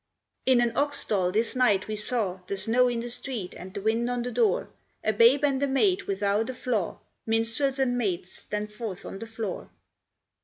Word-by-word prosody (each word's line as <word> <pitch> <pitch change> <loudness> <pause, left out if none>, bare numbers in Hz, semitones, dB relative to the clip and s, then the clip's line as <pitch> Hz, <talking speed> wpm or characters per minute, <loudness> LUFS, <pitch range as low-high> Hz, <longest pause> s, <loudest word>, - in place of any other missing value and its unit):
"In 255 -2 +6
an 235 -1 +1
ox 285 0 +2
stall 185 -7 +1
this 225 +6 0
night 210 -7 +3
we 215 - -3
saw, 210 -3 -1
The 200 - -2
snow 240 +5 +3
in 240 -1 -1
the 240 - -5
street, 235 -7 -4
and 185 +1 -9
the 195 - -6
wind 225 +2 +1
on 245 -1 -1
the 245 - -3
door, 225 -5 +1 0.3
A 215 - +2
Babe 235 +7 +5
and 275 -2 +2
a 280 - +2
maid 365 +9 +2
without 200 +3 0
a 260 - -4
flaw. 225 -8 -1 0.3
Minstrels 230 +5 +1
and 245 -2 +1
maids, 185 -5 -2
stand 210 0 -5
forth 210 -4 -6
on 195 - -7
the 225 - -7
floor. 225 -4 -5
225 Hz, 200 wpm, -27 LUFS, 205-250 Hz, 0.3 s, In